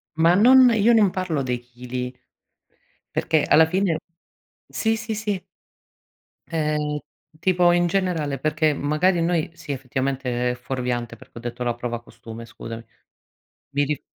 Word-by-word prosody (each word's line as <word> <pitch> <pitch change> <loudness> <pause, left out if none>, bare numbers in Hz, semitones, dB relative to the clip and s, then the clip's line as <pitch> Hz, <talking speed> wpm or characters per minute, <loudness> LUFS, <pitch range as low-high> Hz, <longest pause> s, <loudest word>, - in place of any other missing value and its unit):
Ma 165 +2 +4
non 250 +4 +7
io 225 +2 +4
non 215 -4 +5
parlo 180 -6 -1
dei 125 -1 -2
chili. 125 +1 -6 1.0
Perché 155 -2 +2
alla 160 +2 +6
fine 180 -1 +1 0.7
sì, 225 0 0
sì, 215 0 -4
sì. 205 -4 -2 1.1
Ehm, 150 -2 -1 0.4
tipo 180 -1 +4
in 175 0 +3
generale 170 -7 -1
perché, 155 +2 +1
magari 155 +5 +1
noi 165 -1 0
sì 155 -3 -5
effettivamente 130 -1 -2
è - - -4
fuorviante 125 -1 -3
perché - - -16
ho - - -7
detto 120 +1 -5
la 120 -1 -1
prova 120 0 -4
costume 115 0 -11
scusami. 115 0 -8 0.9
Mi 145 +1 +1
rif 150 0 -2
150 Hz, 140 wpm, -23 LUFS, 125-180 Hz, 1.1 s, non